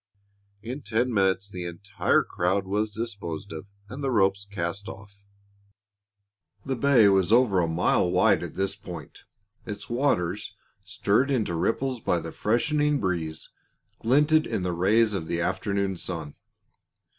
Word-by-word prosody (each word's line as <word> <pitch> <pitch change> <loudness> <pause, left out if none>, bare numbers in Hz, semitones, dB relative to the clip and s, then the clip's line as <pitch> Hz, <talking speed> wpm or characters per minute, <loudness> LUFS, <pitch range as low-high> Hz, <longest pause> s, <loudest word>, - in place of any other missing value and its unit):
In 125 +6 -5
ten 120 0 0
minutes 95 -1 +1
the 90 -3 -6
entire 100 +3 0
crowd 95 +3 -1
was 105 +3 -1
disposed 100 -5 -5
of 80 +5 -8 0.2
and 130 +7 -7
the 135 - 0
ropes 100 -3 +2
cast 100 +2 -4
off. 100 0 -12 1.4
The 135 - -1
bay 120 -3 +5
was 95 -1 +3
over 115 -5 +4
a 85 - +2
mile 85 +2 +2
wide - - +3
at - - -6
this 95 0 -1
point. 90 -7 -10 0.4
Its 105 0 -7
waters, 105 -7 0 0.3
stirred 120 +8 +1
into 115 -10 0
ripples 125 +9 -1
by 90 -5 0
the 80 0 -7
freshening 145 +6 +1
breeze, 85 -5 -3 0.5
glinted 150 +6 +3
in 95 - -2
the 90 -1 -1
rays 105 +5 +3
of 85 -5 -3
the 85 - -1
afternoon 95 +2 -1
sun. 80 -5 -5
100 Hz, 145 wpm, -26 LUFS, 90-115 Hz, 1.4 s, bay